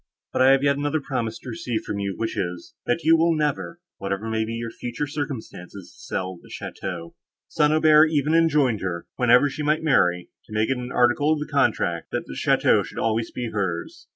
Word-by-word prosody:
"But -, -, +1 dB
I 130 Hz, -, +7 dB
have 135 Hz, 0 st, +4 dB
yet 140 Hz, 0 st, +3 dB
another 145 Hz, +2 st, 0 dB
promise 120 Hz, -6 st, -3 dB
to -, -, -10 dB
receive 125 Hz, -10 st, -3 dB
from 100 Hz, -, -4 dB
you, 100 Hz, -1 st, -2 dB
which 115 Hz, +1 st, -3 dB
is—that 95 Hz, -, -3 dB
you 165 Hz, -, +6 dB
will 165 Hz, 0 st, +3 dB
never, 150 Hz, +2 st, -2 dB, 0.2 s
whatever 100 Hz, +2 st, -3 dB
may 110 Hz, 0 st, 0 dB
be 115 Hz, -, -5 dB
your 115 Hz, 0 st, -4 dB
future 120 Hz, +5 st, -4 dB
circumstances, 125 Hz, -, -7 dB
sell 95 Hz, -1 st, -4 dB
the -, -, -17 dB
château." 85 Hz, -3 st, -6 dB, 0.4 s
St. 150 Hz, 0 st, +2 dB
Aubert 155 Hz, 0 st, +6 dB
even 150 Hz, 0 st, +1 dB
enjoined 150 Hz, -9 st, +3 dB
her, 85 Hz, -3 st, -3 dB
whenever 125 Hz, +3 st, +5 dB
she 145 Hz, +2 st, -5 dB
might 150 Hz, +2 st, +1 dB
marry, 90 Hz, -, +2 dB
to 110 Hz, -, -12 dB
make 110 Hz, +4 st, +1 dB
it 135 Hz, -, 0 dB
an 125 Hz, 0 st, -6 dB
article 125 Hz, +5 st, +3 dB
in 155 Hz, -, -2 dB
the 150 Hz, -, -6 dB
contract, 110 Hz, -, +1 dB
that -, -, -3 dB
the -, -, -8 dB
château -, -, +3 dB
should -, -, -11 dB
always 115 Hz, 0 st, 0 dB
be 120 Hz, -2 st, -5 dB
hers. 95 Hz, -5 st, -4 dB
125 Hz, 205 wpm, -24 LUFS, 100-150 Hz, 0.4 s, I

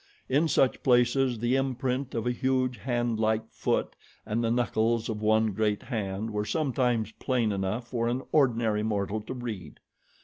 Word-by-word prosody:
In 145 Hz, +5 st, +2 dB
such 135 Hz, -3 st, +2 dB
places 125 Hz, -1 st, +3 dB
the 120 Hz, +3 st, +1 dB
imprint 130 Hz, 0 st, -1 dB
of 115 Hz, -, -2 dB
a 125 Hz, -, +2 dB
huge 130 Hz, 0 st, 0 dB
handlike 115 Hz, -3 st, 0 dB
foot -, -, -1 dB, 0.3 s
and 115 Hz, +2 st, -1 dB
the 115 Hz, -, +1 dB
knuckles 115 Hz, -1 st, +1 dB
of 105 Hz, -1 st, -3 dB
one 110 Hz, 0 st, +3 dB
great 105 Hz, +1 st, 0 dB
hand 110 Hz, -2 st, -3 dB
were 105 Hz, 0 st, -1 dB
sometimes 125 Hz, -5 st, 0 dB
plain 120 Hz, -2 st, 0 dB
enough 100 Hz, +5 st, -2 dB
for 115 Hz, -1 st, -1 dB
an 125 Hz, +3 st, -1 dB
ordinary 115 Hz, -7 st, +2 dB
mortal 105 Hz, 0 st, -1 dB
to 115 Hz, -, -6 dB
read. 110 Hz, -, -6 dB
115 Hz, 160 wpm, -28 LUFS, 110-125 Hz, 0.3 s, places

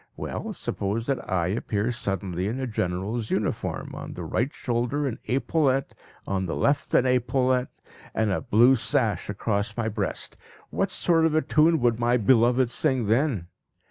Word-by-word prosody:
Well, -, -, -4 dB
suppose 105 Hz, +4 st, -3 dB
that 135 Hz, 0 st, -2 dB
I 90 Hz, -2 st, +1 dB
appear 105 Hz, +2 st, -1 dB
suddenly 95 Hz, -5 st, -2 dB
in 120 Hz, +5 st, -3 dB
a 130 Hz, -, -1 dB
general's 105 Hz, +1 st, -2 dB
uniform, -, -, -2 dB
on -, -, -7 dB
the -, -, -6 dB
right 125 Hz, +5 st, -1 dB
shoulder 125 Hz, +4 st, -1 dB
an 125 Hz, -4 st, -3 dB
epaulette, 135 Hz, 0 st, +1 dB, 0.3 s
on 95 Hz, -1 st, -1 dB
the 85 Hz, -, -2 dB
left 140 Hz, 0 st, +1 dB
an 130 Hz, -, +5 dB
epaulette, 125 Hz, 0 st, +1 dB, 0.5 s
and 110 Hz, -2 st, +1 dB
a -, -, 0 dB
blue 120 Hz, +5 st, +5 dB
sash 110 Hz, -5 st, 0 dB
across 100 Hz, +2 st, -2 dB
my 115 Hz, -1 st, 0 dB
breast, 105 Hz, -2 st, -3 dB, 0.3 s
what -, -, 0 dB
sort 165 Hz, -2 st, +3 dB
of 155 Hz, -, -1 dB
a 155 Hz, -, +3 dB
tune 160 Hz, +2 st, +3 dB
would 120 Hz, -1 st, +2 dB
my 120 Hz, +1 st, +3 dB
beloved 120 Hz, +2 st, +3 dB
sing 130 Hz, -3 st, +1 dB
then? 110 Hz, -, +1 dB
120 Hz, 165 wpm, -26 LUFS, 105-130 Hz, 0.5 s, an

